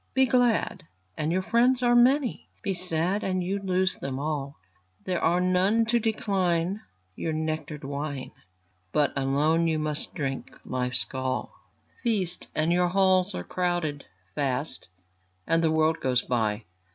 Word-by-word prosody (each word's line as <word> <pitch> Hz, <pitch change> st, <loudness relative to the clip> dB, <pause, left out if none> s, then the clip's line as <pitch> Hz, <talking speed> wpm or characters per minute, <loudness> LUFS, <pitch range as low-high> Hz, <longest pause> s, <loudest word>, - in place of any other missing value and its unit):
Be 265 Hz, 0 st, +5 dB
glad, 235 Hz, -8 st, +1 dB, 0.3 s
and 155 Hz, +1 st, -1 dB
your 185 Hz, +2 st, +1 dB
friends 245 Hz, +4 st, +3 dB
are 240 Hz, 0 st, +4 dB
many; 255 Hz, +2 st, +3 dB
Be 195 Hz, -, 0 dB
sad, 180 Hz, +2 st, 0 dB
and 185 Hz, -1 st, 0 dB
you 195 Hz, +3 st, -1 dB
lose 185 Hz, 0 st, 0 dB
them 135 Hz, -1 st, -4 dB
all; 140 Hz, -1 st, -3 dB, 0.5 s
There 180 Hz, -2 st, -2 dB
are 175 Hz, +2 st, +3 dB
none 185 Hz, +5 st, +3 dB
to 235 Hz, +1 st, +2 dB
decline 195 Hz, -4 st, 0 dB, 0.3 s
your 160 Hz, -, -2 dB
nectar'd 155 Hz, -1 st, -3 dB
wine, 140 Hz, -1 st, -4 dB, 0.6 s
But 145 Hz, +6 st, +2 dB
alone 145 Hz, +5 st, +2 dB
you 160 Hz, -1 st, +1 dB
must 155 Hz, -1 st, -3 dB
drink 135 Hz, -5 st, -4 dB
life's 125 Hz, -2 st, -1 dB
gall. 130 Hz, +4 st, -3 dB, 0.5 s
Feast, 205 Hz, -8 st, 0 dB
and 155 Hz, +2 st, +1 dB
your 180 Hz, 0 st, +3 dB
halls 190 Hz, +1 st, +3 dB
are -, -, -4 dB
crowded; 175 Hz, -5 st, -2 dB, 0.3 s
Fast, 140 Hz, +3 st, -2 dB, 0.6 s
and 165 Hz, 0 st, +2 dB
the 160 Hz, -, +4 dB
world 160 Hz, 0 st, +2 dB
goes 125 Hz, -1 st, +1 dB
by. 110 Hz, -3 st, 0 dB
170 Hz, 145 wpm, -27 LUFS, 145-190 Hz, 0.6 s, Be